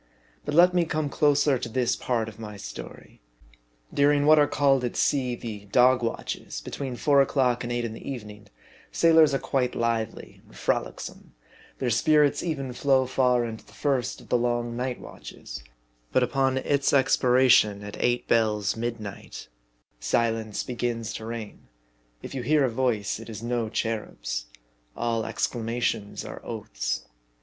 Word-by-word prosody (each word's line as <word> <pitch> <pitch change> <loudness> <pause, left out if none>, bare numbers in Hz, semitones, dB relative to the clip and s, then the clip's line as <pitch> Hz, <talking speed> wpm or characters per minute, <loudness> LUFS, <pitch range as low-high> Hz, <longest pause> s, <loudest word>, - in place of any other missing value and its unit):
But 145 - -2
let 180 +2 +6
me 175 -1 +3
come 155 -2 -2
closer 145 -2 +3
to 120 -1 -5
this 125 0 +1
part 115 -3 -1
of 110 0 -10
my 105 -2 -7
story. - - -10 0.7
During 145 0 +3
what 155 0 +7
are 145 - +5
called 135 -3 +2
at 120 - -2
sea 130 -4 +1
the 105 -4 -7
" 100 - -23
dog 125 0 +5
watches" 115 - -4
(between 135 -3 -5
four 140 +2 +4
o'clock 125 -3 +1
and 120 - -4
eight 120 0 -1
in 110 - -4
the 115 - -8
evening), 105 -5 -9 0.4
sailors 160 -2 +5
are 135 - +1
quite 130 -2 -1
lively 115 -1 -2
and - - -19
frolicsome; - - -3 0.4
their 125 -2 -1
spirits 150 +4 +3
even 140 -7 -3
flow 135 0 +2
far 125 -2 +2
into 110 -1 -7
the - - -20
first 135 -5 -1
of - - -17
the 125 - +3
long 120 0 -1
"night 125 0 -3
watches - - -10 0.2
;" - - -40
but 130 - +3
upon 130 +1 +1
its 140 +1 +1
expiration 125 -6 +4
at 105 0 -7
"eight 120 0 +1
bells" 105 -3 +2
(midnight), 115 - -6 0.5
silence 110 - 0
begins 120 -2 -3
to 110 - -6
reign; 115 -2 -7 0.6
if - - -7
you 135 - -3
hear 145 +3 +3
a 130 - +1
voice 115 -5 0
it 115 - -10
is 110 0 -7
no 120 -2 -1
cherub's: - - -3 0.5
all 115 -2 -1
exclamations 115 -3 -2
are - - -8
oaths. - - -4
120 Hz, 160 wpm, -26 LUFS, 110-135 Hz, 0.7 s, what